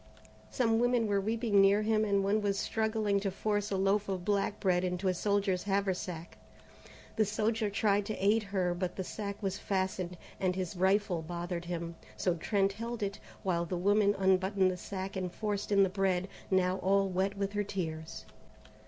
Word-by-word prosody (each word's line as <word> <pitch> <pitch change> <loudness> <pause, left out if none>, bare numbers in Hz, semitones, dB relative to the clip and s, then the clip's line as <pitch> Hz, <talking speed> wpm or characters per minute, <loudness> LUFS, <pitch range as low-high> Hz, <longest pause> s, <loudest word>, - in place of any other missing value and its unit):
Some 225 -3 +2
women 245 -1 +2
were 200 -2 +1
weeping 220 -1 +2
near 200 +2 +5
him 215 0 +2
and 200 -1 +2
one 205 +2 +2
was 200 -1 0
struggling 220 -1 0
to 195 0 -1
force 205 +1 -1
a 195 - -1
loaf 195 +2 +1
of 185 -2 -3
black 205 0 0
bread 180 -2 +2
into 180 +1 -1
a 185 - +3
soldier's 200 -1 +1
haversack. 190 -4 -2 0.8
The 220 - +5
soldier 215 +1 0
tried 205 0 +1
to 215 - -2
aid 210 +3 +3
her, 190 -3 0
but 180 0 -3
the 190 - -3
sack 200 +2 -6
was 195 0 -1
fastened, 185 -2 -2 0.2
and 185 -1 +1
his 185 0 -3
rifle 190 -1 +2
bothered 175 +1 -4
him, 170 -1 -4 0.2
so 180 - +1
Trent 195 +3 +1
held 230 +1 -4
it, 200 0 -3 0.2
while 175 -3 +1
the 180 +1 -3
woman 205 +2 +3
unbuttoned 190 0 +3
the - - -3
sack 190 +1 -5
and 185 -2 -2
forced 205 +1 -3
in 200 -1 +6
the - - +4
bread, 190 -1 0 0.2
now 185 -1 +2
all 195 +1 +2
wet 190 +2 -1
with 200 0 -2
her 205 0 0
tears. 160 -5 -5
195 Hz, 185 wpm, -31 LUFS, 185-205 Hz, 0.8 s, in